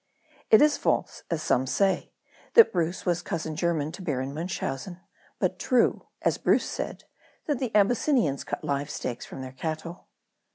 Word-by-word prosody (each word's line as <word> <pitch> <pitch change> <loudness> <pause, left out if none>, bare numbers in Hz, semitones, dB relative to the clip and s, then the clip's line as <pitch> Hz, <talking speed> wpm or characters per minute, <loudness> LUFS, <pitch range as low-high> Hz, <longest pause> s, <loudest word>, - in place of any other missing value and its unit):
It 440 -9 +8
is 300 -1 +4
false, - - 0
as 160 -2 -2
some 130 +1 +2
say, 195 +7 +1 0.4
that 460 - +8
Bruce 175 0 -1
was 175 -1 +1
cousin 160 -2 -4
german 160 -2 0
to 190 - -9
Baron 135 -5 -2
Munchausen; 170 0 -4 0.4
but - - -1
true, 250 -2 +2 0.2
as - - +1
Bruce - - +3
said, - - -5 0.4
that 290 -5 -1
the 255 - -1
Abysinnians 210 - +3
cut - - -5
live 140 0 -1
steaks 120 -1 -4
from - - -8
their 130 - -7
cattle. 160 +5 -5
170 Hz, 160 wpm, -27 LUFS, 145-200 Hz, 0.4 s, It